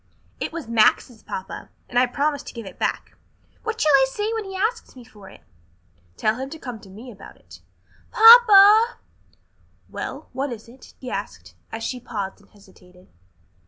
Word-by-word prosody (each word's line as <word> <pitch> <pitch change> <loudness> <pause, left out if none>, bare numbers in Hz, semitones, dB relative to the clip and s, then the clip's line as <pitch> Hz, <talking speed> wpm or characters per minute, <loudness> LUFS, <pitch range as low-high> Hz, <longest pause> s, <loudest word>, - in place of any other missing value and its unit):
"It - - -4
was 325 -6 -7
Max's, 230 +1 +1
papa, 190 - -8 0.2
and 245 - 0
I 255 - +3
promised 285 +3 -2
to - - -10
give 230 -2 -8
it 190 - -12
back. - - -3 0.5
What 445 0 -5
shall 305 - +2
I 265 -1 +5
say 420 +10 -3
when 445 -2 -4
he 385 0 -8
asks 435 - -3
me 250 - -13
for 205 -4 -16
it?" - - -17 0.8
"Tell 215 +1 0
him 265 +1 -6
to 320 - -9
come 245 -7 -8
to 195 - -16
me 225 +6 -12
about 200 - -14
it." - - -17 0.5
"Papa 445 -1 +7 0.5
" - - -38
"Well, - - -6
what 275 0 -3
is 225 -1 -9
it?" 250 +2 -17
he 255 - -8
asked, 90 - -7 0.2
as 225 0 -6
she 250 +2 -4
paused 205 -5 -6
and 205 - -25
hesitated. 185 -3 -21
250 Hz, 185 wpm, -22 LUFS, -, 0.8 s, Papa